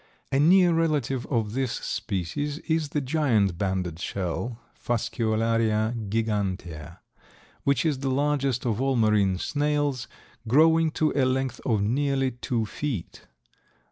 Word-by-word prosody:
A 135 Hz, -, +2 dB
near 175 Hz, +3 st, +5 dB
relative 145 Hz, -6 st, 0 dB
of 110 Hz, -5 st, -1 dB
this 130 Hz, -2 st, -1 dB
species 115 Hz, -, -3 dB
is 160 Hz, -2 st, 0 dB
the 150 Hz, -, -1 dB
giant 125 Hz, -, +1 dB
banded 95 Hz, -4 st, -2 dB
shell 100 Hz, +6 st, -3 dB, 0.2 s
(Fasciolaria 115 Hz, -1 st, 0 dB, 0.2 s
gigantea), 95 Hz, -7 st, -2 dB, 0.7 s
which 140 Hz, +1 st, +2 dB
is 150 Hz, -4 st, +1 dB
the 135 Hz, 0 st, -1 dB
largest 140 Hz, -2 st, 0 dB
of 115 Hz, 0 st, 0 dB
all 135 Hz, 0 st, +1 dB
marine 105 Hz, -5 st, +3 dB
snails, 145 Hz, 0 st, -1 dB, 0.4 s
growing 160 Hz, +6 st, +5 dB
to 155 Hz, 0 st, 0 dB
a 140 Hz, -, +3 dB
length 130 Hz, 0 st, -1 dB
of 110 Hz, -5 st, +2 dB
nearly 135 Hz, +3 st, +1 dB
two 120 Hz, -1 st, -2 dB
feet. 120 Hz, -, -5 dB
125 Hz, 125 wpm, -26 LUFS, 105-145 Hz, 0.7 s, near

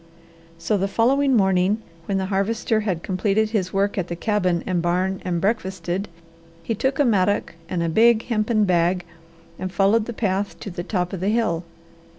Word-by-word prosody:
So 175 Hz, +5 st, 0 dB
the 195 Hz, -, +1 dB
following 265 Hz, +6 st, +2 dB
morning, 190 Hz, 0 st, +3 dB, 0.3 s
when 195 Hz, -, 0 dB
the 190 Hz, -, -1 dB
Harvester 220 Hz, +3 st, +1 dB
had 190 Hz, -6 st, -2 dB
completed 205 Hz, +3 st, 0 dB
his 190 Hz, -5 st, -1 dB
work 200 Hz, +1 st, 0 dB
at 180 Hz, -, -2 dB
the 170 Hz, -, -4 dB
cabin 185 Hz, -3 st, 0 dB
and 180 Hz, -2 st, 0 dB
barn 180 Hz, +2 st, 0 dB
and 175 Hz, -2 st, -1 dB
breakfasted, 190 Hz, -2 st, -2 dB, 0.6 s
he 225 Hz, -, -1 dB
took 265 Hz, +5 st, -1 dB
a 290 Hz, -, +3 dB
mattock 205 Hz, -3 st, +1 dB, 0.2 s
and 175 Hz, -2 st, -1 dB
a -, -, 0 dB
big 225 Hz, +6 st, +4 dB
hempen 215 Hz, -1 st, +1 dB
bag, 180 Hz, -1 st, +1 dB, 0.5 s
and 185 Hz, 0 st, -4 dB
followed 205 Hz, +4 st, +3 dB
the -, -, -3 dB
path 200 Hz, -2 st, -2 dB
to 200 Hz, -, -6 dB
the 175 Hz, -, -5 dB
top 180 Hz, -1 st, -2 dB
of 190 Hz, -, -3 dB
the 190 Hz, +3 st, 0 dB
hill. 215 Hz, -7 st, 0 dB
195 Hz, 180 wpm, -23 LUFS, 180-220 Hz, 0.6 s, big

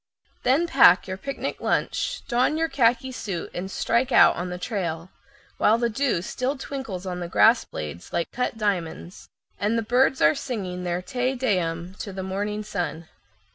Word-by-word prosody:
Then 270 Hz, +7 st, +3 dB
pack 265 Hz, -, +6 dB
your 190 Hz, 0 st, -5 dB
lunch 275 Hz, +4 st, -4 dB, 0.7 s
basket, -, -, -30 dB
don 255 Hz, +5 st, +2 dB
your 325 Hz, 0 st, 0 dB
khaki 260 Hz, -1 st, +2 dB
suit, 195 Hz, -8 st, -5 dB
and 185 Hz, +2 st, -4 dB
strike 235 Hz, +6 st, 0 dB
out -, -, +7 dB
on 180 Hz, +1 st, -4 dB
the 180 Hz, -, -4 dB
trail, 180 Hz, -3 st, -4 dB, 0.5 s
while 220 Hz, -, +4 dB
the 235 Hz, 0 st, 0 dB
dew 230 Hz, -7 st, 0 dB
still 260 Hz, +7 st, -2 dB
twinkles 265 Hz, -9 st, -6 dB
on 180 Hz, -1 st, -4 dB
the 175 Hz, -, -4 dB
grass 225 Hz, +6 st, +4 dB
blades 75 Hz, +2 st, -7 dB
like 170 Hz, -1 st, -2 dB
cut 250 Hz, -2 st, -2 dB
diamonds, 185 Hz, -4 st, -3 dB, 0.3 s
and 210 Hz, +3 st, +1 dB
the 230 Hz, -, 0 dB
birds 255 Hz, +4 st, +2 dB
are 150 Hz, +1 st, +5 dB
singing 185 Hz, -8 st, -4 dB
their 175 Hz, +1 st, -2 dB
Te 255 Hz, +3 st, -1 dB
Deum 180 Hz, -8 st, -1 dB
to 200 Hz, -, -5 dB
the 190 Hz, 0 st, -5 dB
morning 205 Hz, +3 st, -3 dB
sun. 170 Hz, -5 st, -4 dB
210 Hz, 175 wpm, -25 LUFS, 180-250 Hz, 0.7 s, out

